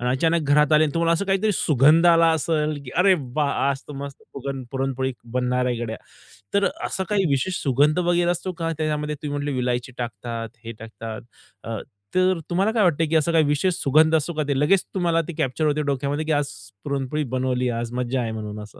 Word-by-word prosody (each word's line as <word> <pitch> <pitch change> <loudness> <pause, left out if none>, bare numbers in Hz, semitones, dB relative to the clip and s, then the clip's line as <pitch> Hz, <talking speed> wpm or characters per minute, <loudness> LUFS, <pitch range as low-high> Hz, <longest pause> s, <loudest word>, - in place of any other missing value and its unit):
आणि 125 +1 0
अचानक 160 +6 +2
घरात 150 +1 +4
आले 155 +1 +6
आणि 145 - -3
तुम्हाला 165 0 +2
असं 170 +4 0
काहीतरी 195 +2 +1
सुगंध 155 +2 +4
आला 165 -1 +6
असेल, 155 -1 0
की 125 - -8
"अरे 190 +1 +6 0.2
वाह! 150 -2 +1 0.2
आज 135 -1 -2
मस्त 140 0 -8
पुरण 135 -1 -5
पुरणपोळी 135 -1 -2 0.2
बनणार 125 0 +1
आहे 125 -1 0
गड्या." 110 -1 -5 0.6
तर 200 0 +3 0.2
असं 190 - -2
काही 200 -2 +2
विशेष 140 +7 0
सुगंध 145 +5 +3
वगेरे 175 0 +2
असतो 185 +2 -3
का 165 -1 -3
त्याच्यामध्ये? 150 -1 -1
तुम्ही 145 -1 -4
म्हटले 145 0 -2
विलायची 125 0 -1
टाकतात, 115 -1 -5 0.2
हे 115 - -5
टाकतात. 110 +1 -8 0.4
अ, 115 -1 -4 0.4
तर 185 -1 +3
तुम्हाला 195 +5 +1
काय 220 -3 +2
वाटतंय, 165 -2 +2
की 160 - -1
असं 160 +2 +3
काही 160 -1 +4
विशेष 150 +6 +1
सुगंध 155 +3 +4
असतो 160 +2 0
का, 155 0 -1
ते 140 -2 0
लगेच 180 +6 +3
तुम्हाला 170 -2 +2
ते 175 - -5
कॅप्चर 155 +1 0
होते 150 0 +1
डोक्यामध्ये, 140 +3 -2
की 155 - -1
आज 145 -1 0 0.3
पुरणपोळी 140 +1 -2
बनवली. 125 -1 0
आज 115 0 -3
मज्जा 125 +1 -1
आहे 115 -1 -2
म्हणून 105 -1 -6
असं? 105 - -14
150 Hz, 205 wpm, -23 LUFS, 125-165 Hz, 0.6 s, आले